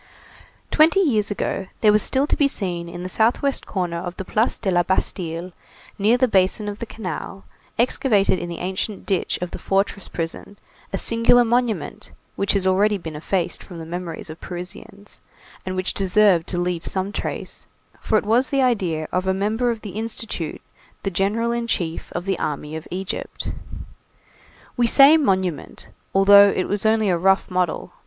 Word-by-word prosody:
Twenty 320 Hz, +5 st, +5 dB
years 225 Hz, -, +2 dB
ago, 195 Hz, -2 st, -3 dB
there 215 Hz, -, +6 dB
was 210 Hz, 0 st, +4 dB
still 265 Hz, +6 st, +3 dB
to -, -, 0 dB
be 285 Hz, -, +3 dB
seen 175 Hz, -9 st, -2 dB
in 175 Hz, +1 st, -7 dB
the -, -, -3 dB
southwest 240 Hz, +8 st, +1 dB
corner 175 Hz, -4 st, -2 dB
of 175 Hz, +1 st, -6 dB
the 190 Hz, -, -5 dB
Place 220 Hz, +6 st, +1 dB
de 195 Hz, -, -1 dB
la 175 Hz, -1 st, +4 dB
Bastille, 175 Hz, -1 st, -1 dB, 0.5 s
near 215 Hz, +5 st, +4 dB
the 255 Hz, 0 st, +3 dB
basin 195 Hz, 0 st, +2 dB
of 205 Hz, 0 st, -5 dB
the 235 Hz, -, -5 dB
canal, 195 Hz, -1 st, -6 dB, 0.3 s
excavated 220 Hz, -5 st, +2 dB
in 175 Hz, -, -5 dB
the 170 Hz, -, -5 dB
ancient 190 Hz, +3 st, -3 dB
ditch 190 Hz, -3 st, 0 dB
of 180 Hz, -, -5 dB
the -, -, -7 dB
fortress 195 Hz, 0 st, -1 dB
prison, 165 Hz, +4 st, -5 dB, 0.3 s
a 195 Hz, -, -1 dB
singular 230 Hz, +2 st, +4 dB
monument, 240 Hz, -1 st, -1 dB, 0.2 s
which 200 Hz, -, 0 dB
has 195 Hz, -2 st, +1 dB
already 200 Hz, +3 st, +3 dB
been 160 Hz, -4 st, -8 dB
effaced 170 Hz, +3 st, -2 dB
from 175 Hz, -, -11 dB
the 165 Hz, -, -7 dB
memories 170 Hz, -1 st, -6 dB
of 155 Hz, -, -12 dB
Parisians, 190 Hz, +3 st, -9 dB, 0.5 s
and 185 Hz, -, -2 dB
which 185 Hz, 0 st, -1 dB
deserved 195 Hz, -3 st, +3 dB
to 180 Hz, -, -3 dB
leave 175 Hz, -1 st, -2 dB
some 190 Hz, +1 st, -1 dB
trace, -, -, -5 dB, 0.3 s
for 220 Hz, -, +1 dB
it 210 Hz, -, -1 dB
was 240 Hz, +5 st, +2 dB
the 275 Hz, -1 st, +2 dB
idea 180 Hz, -11 st, 0 dB
of 185 Hz, +1 st, -1 dB
a 190 Hz, -, +2 dB
"member 220 Hz, +5 st, 0 dB
of 230 Hz, -2 st, -3 dB
the 205 Hz, -, -7 dB
Institute, 215 Hz, -5 st, -4 dB, 0.4 s
the 195 Hz, -, -1 dB
General 210 Hz, +6 st, 0 dB
in 235 Hz, 0 st, -2 dB
chief 170 Hz, -7 st, -2 dB
of 175 Hz, -, -4 dB
the 195 Hz, -2 st, -1 dB
army 150 Hz, +1 st, -3 dB
of 160 Hz, -, -7 dB
Egypt." 185 Hz, +1 st, -4 dB, 1.2 s
We 240 Hz, -1 st, +2 dB
say 275 Hz, +5 st, +8 dB
monument, 185 Hz, -, -1 dB, 0.3 s
although 200 Hz, +1 st, +8 dB
it 185 Hz, -, -1 dB
was 205 Hz, +1 st, 0 dB
only 220 Hz, -2 st, +2 dB
a 175 Hz, -, +1 dB
rough 190 Hz, +2 st, +2 dB
model. 180 Hz, -2 st, -1 dB
195 Hz, 180 wpm, -22 LUFS, 180-220 Hz, 1.2 s, say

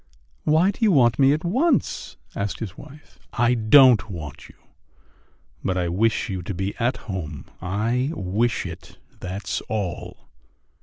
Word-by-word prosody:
"Why 160 Hz, +6 st, +4 dB
do 205 Hz, -, -6 dB
you 215 Hz, -, +5 dB
want 120 Hz, -7 st, +4 dB
me 135 Hz, 0 st, +6 dB
at 150 Hz, +2 st, 0 dB
once?" 260 Hz, -, 0 dB, 0.2 s
asked 100 Hz, -3 st, -2 dB
his 100 Hz, -5 st, -6 dB
wife. 145 Hz, 0 st, -15 dB
"I 120 Hz, 0 st, +3 dB
don't 115 Hz, -1 st, +6 dB
want 80 Hz, -6 st, -8 dB
you, -, -, -17 dB, 1.1 s
but 95 Hz, -, 0 dB
I 90 Hz, -1 st, 0 dB
wish 110 Hz, +8 st, +1 dB
you 95 Hz, -4 st, -4 dB
to 90 Hz, +2 st, -5 dB
be 95 Hz, +3 st, -2 dB
at 125 Hz, +2 st, +1 dB
home. 85 Hz, -8 st, -5 dB, 0.2 s
I 115 Hz, +8 st, 0 dB
wish 105 Hz, +5 st, -1 dB
it, -, -, -9 dB, 0.2 s
that's 90 Hz, 0 st, -4 dB
all." 100 Hz, -5 st, -4 dB
110 Hz, 150 wpm, -23 LUFS, 95-135 Hz, 1.1 s, me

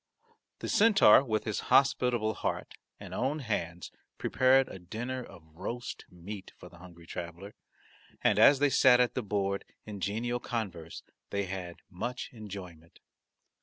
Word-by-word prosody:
The -, -, -4 dB
centaur 205 Hz, -, +6 dB
with 110 Hz, -5 st, -1 dB
his 105 Hz, -1 st, -2 dB
hospitable 125 Hz, -5 st, +3 dB
heart -, -, -3 dB, 0.3 s
and -, -, -9 dB
own 135 Hz, +5 st, -1 dB
hands 90 Hz, -, -4 dB, 0.3 s
prepared 130 Hz, +1 st, +3 dB
a 95 Hz, -, -9 dB
dinner 120 Hz, +8 st, -5 dB
of 90 Hz, -7 st, -14 dB
roast 120 Hz, +7 st, -6 dB
meat 95 Hz, +3 st, -9 dB
for 90 Hz, -, -12 dB
the 85 Hz, 0 st, -16 dB
hungry 85 Hz, -1 st, -14 dB
traveller, 85 Hz, +4 st, -7 dB, 0.7 s
and -, -, +3 dB
as 140 Hz, -, +8 dB
they 145 Hz, 0 st, +2 dB
sat 125 Hz, -2 st, +6 dB
at 125 Hz, -1 st, +3 dB
the 130 Hz, -, -1 dB
board 100 Hz, -2 st, -1 dB, 0.2 s
in 105 Hz, -2 st, -7 dB
genial 115 Hz, +5 st, -2 dB
converse 100 Hz, -10 st, -5 dB, 0.3 s
they 100 Hz, 0 st, -1 dB
had 90 Hz, -2 st, -6 dB
much 120 Hz, +7 st, -5 dB
enjoyment. 95 Hz, -7 st, -10 dB
105 Hz, 145 wpm, -30 LUFS, 90-125 Hz, 0.7 s, as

